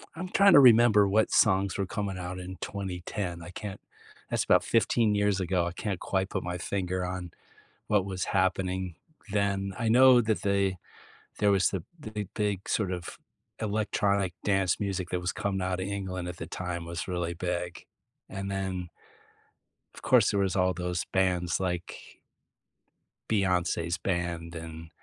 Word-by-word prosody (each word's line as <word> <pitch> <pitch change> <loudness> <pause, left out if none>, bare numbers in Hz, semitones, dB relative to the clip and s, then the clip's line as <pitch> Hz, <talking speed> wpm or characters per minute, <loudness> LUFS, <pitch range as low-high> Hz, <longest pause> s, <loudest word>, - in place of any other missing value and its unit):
I'm 180 +3 -5
trying 200 0 +6
to 145 - +10
remember 115 -5 +7
what 110 +3 +2
songs 95 -2 +3
were 100 - 0
coming 100 -1 -3
out 90 0 -5
in 90 0 -7
2010. 90 -2 -4
I 80 - -9
can't 100 +1 -7 0.5
that's - - +1
about - - +4
15 115 -1 +2
years 100 -1 +2
ago, 90 -1 +1
I - - -3
can't 95 +1 -4
quite 95 0 -1
put - - -3
my 90 0 -3
finger 95 -1 -2
on 90 -1 -5 0.6
what 105 -3 +3
was 95 -2 -3
happening 95 -1 0 0.4
then. 100 -2 0
I 115 - 0
know 125 +2 +7
that 110 -2 0
they 100 -2 +1 0.6
there 105 0 +3
was 95 -2 +3
the 95 -4 -3 0.2
big 110 -6 -5
big, 105 -3 -2
sort 100 -4 0
of, 90 -2 -6 0.4
electronic 100 -3 0
dance 95 -3 +1
music 95 -3 -2
that 90 - -1
was 90 - -2
coming 100 -3 -2
outta 95 0 -1
England 95 -3 -4
at 90 - -6
the - - -5
time 90 -2 -4
was 85 +1 -5
really 85 -1 -2
big. 90 0 -4 0.4
And 100 0 -5
then 95 -2 -3 1.1
of - - -12
course, - - +4
there 100 - 0
was 95 -2 +1
all 90 -1 +2
those 90 0 -3
bands 90 -3 +1
like 90 -2 -5 1.1
Beyonce's 90 -4 +1
band 85 -2 -3
and 80 0 -8
95 Hz, 160 wpm, -28 LUFS, 90-100 Hz, 1.1 s, to